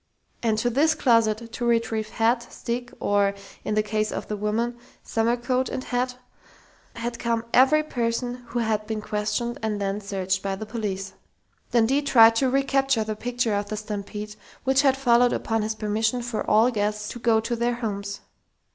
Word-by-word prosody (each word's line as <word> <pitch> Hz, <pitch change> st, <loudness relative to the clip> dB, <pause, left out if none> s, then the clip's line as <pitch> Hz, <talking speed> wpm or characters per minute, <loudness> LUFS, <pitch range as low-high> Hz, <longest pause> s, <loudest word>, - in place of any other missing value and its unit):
_And 220 Hz, -2 st, +1 dB
to 240 Hz, +2 st, +1 dB
this 310 Hz, +6 st, +3 dB
closet, 230 Hz, -4 st, +2 dB
to 245 Hz, -, -4 dB
retrieve 225 Hz, -2 st, +1 dB
hat, 235 Hz, +2 st, 0 dB
stick 245 Hz, +1 st, -4 dB
or 200 Hz, -1 st, +2 dB, 0.3 s
in 215 Hz, -, -1 dB
the 215 Hz, -, +3 dB
case 215 Hz, 0 st, -1 dB
of -, -, -4 dB
the 210 Hz, -, -1 dB
women, 225 Hz, +4 st, -1 dB, 0.2 s
summer 230 Hz, +2 st, +1 dB
coat 255 Hz, +2 st, 0 dB
and 255 Hz, -, -4 dB
hat 250 Hz, 0 st, -1 dB, 0.8 s
had 235 Hz, 0 st, -4 dB
come 230 Hz, -1 st, -1 dB
every 285 Hz, +5 st, +5 dB
person 245 Hz, -2 st, -2 dB
who 235 Hz, -, -5 dB
had 220 Hz, -2 st, 0 dB
been 220 Hz, -1 st, -2 dB
questioned 210 Hz, +3 st, -2 dB
and 215 Hz, -2 st, -1 dB
then 200 Hz, +1 st, -2 dB
searched 190 Hz, -2 st, -1 dB
by 195 Hz, -1 st, -2 dB
the 220 Hz, -, -6 dB
police._ 205 Hz, -4 st, -4 dB, 0.6 s
Dundee 245 Hz, +4 st, +3 dB
tried 230 Hz, -5 st, +6 dB
to 265 Hz, +2 st, +2 dB
recapture 270 Hz, -2 st, +2 dB
the 215 Hz, 0 st, -3 dB
picture 240 Hz, 0 st, -1 dB
of 205 Hz, 0 st, -1 dB
the 215 Hz, -, -3 dB
stampede 210 Hz, 0 st, -6 dB, 0.3 s
which 265 Hz, +1 st, +3 dB
had 270 Hz, -2 st, +3 dB
followed 245 Hz, -2 st, +4 dB
upon 225 Hz, -1 st, -1 dB
his 215 Hz, +1 st, -2 dB
permission 220 Hz, +3 st, 0 dB
for 240 Hz, -2 st, -3 dB
all 225 Hz, +4 st, +5 dB
guests 210 Hz, -1 st, -1 dB
to 240 Hz, -, -7 dB
go 230 Hz, -1 st, +3 dB
to 235 Hz, +2 st, -2 dB
their 240 Hz, +1 st, 0 dB
homes. 200 Hz, -4 st, -4 dB
225 Hz, 180 wpm, -25 LUFS, 210-245 Hz, 0.8 s, tried